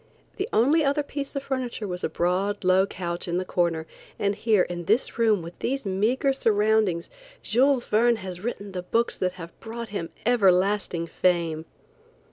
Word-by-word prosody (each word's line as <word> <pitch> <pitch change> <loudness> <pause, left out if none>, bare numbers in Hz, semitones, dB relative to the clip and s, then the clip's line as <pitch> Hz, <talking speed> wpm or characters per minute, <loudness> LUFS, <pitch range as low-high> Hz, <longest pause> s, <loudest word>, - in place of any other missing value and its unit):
The 390 +3 -2
only 295 +8 +4
other 285 +1 +1
piece 285 -1 -5
of 275 - -2
furniture 255 -6 -3
was 180 -1 -4
a - - 0
broad, 190 +4 0
low 185 +1 +4
couch 175 -2 -4
in 175 0 -1
the 185 - -2
corner, 170 -3 0 0.3
and 200 0 +1
here 215 -2 +2
in 175 -1 -5
this 225 +5 +1
room 215 -6 +3
with 170 +1 -10
these 270 -1 -2
meagre 220 +8 +1
surroundings, 215 -7 +2 0.4
Jules 255 +2 +3
Verne 235 +2 +3
has 185 -4 -7
written 205 -3 -5
the 185 -1 -4
books 230 +6 0
that 180 -1 -1
have 170 -2 -11
brought 230 +1 -7
him 180 -5 -4 0.2
everlasting 195 -5 +2
fame. 170 -2 0
205 Hz, 170 wpm, -25 LUFS, 180-235 Hz, 0.4 s, only